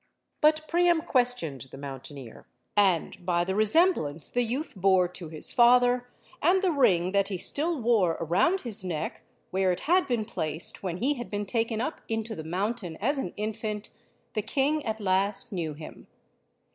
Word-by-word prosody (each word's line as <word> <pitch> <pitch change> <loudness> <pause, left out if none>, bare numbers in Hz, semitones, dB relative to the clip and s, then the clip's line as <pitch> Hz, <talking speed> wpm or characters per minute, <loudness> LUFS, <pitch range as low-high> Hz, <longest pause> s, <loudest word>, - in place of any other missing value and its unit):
But 310 +1 +3
Priam 345 -1 +3
questioned 205 - +1
the - - -11
mountaineer. 135 -2 -9 0.3
And, 190 -2 +2
by 175 -1 +1
the 190 +2 -2
resemblance 215 - +2
the 245 - +1
youth 250 +7 -3
bore 190 -1 +3
to 175 -2 -8
his 155 -1 -1
father, 245 0 +4 0.3
and 370 +5 +3
the 370 - +3
ring 185 - +3
that 200 0 +2
he 195 - -3
still 305 - 0
wore 220 -8 +2
around 185 - +2
his 220 -6 0
neck, 170 -5 -4 0.3
where 190 0 +2
it 180 - -3
had 360 +4 +2
been 235 -4 0
placed 160 -7 -3
when 180 -3 -3
he 265 +9 +1
had 240 -4 -7
been 205 0 -3
taken 225 +1 -1
up 300 +5 -4
into 225 0 -3
the 160 - -6
mountain 185 +1 -3
as 275 +7 0
an 180 - -3
infant, 215 0 -4 0.4
the 215 - 0
king 280 +7 0
at 220 0 -2
last 195 0 0
knew 165 -6 -3
him. 155 +1 -11
210 Hz, 170 wpm, -27 LUFS, 175-250 Hz, 0.4 s, father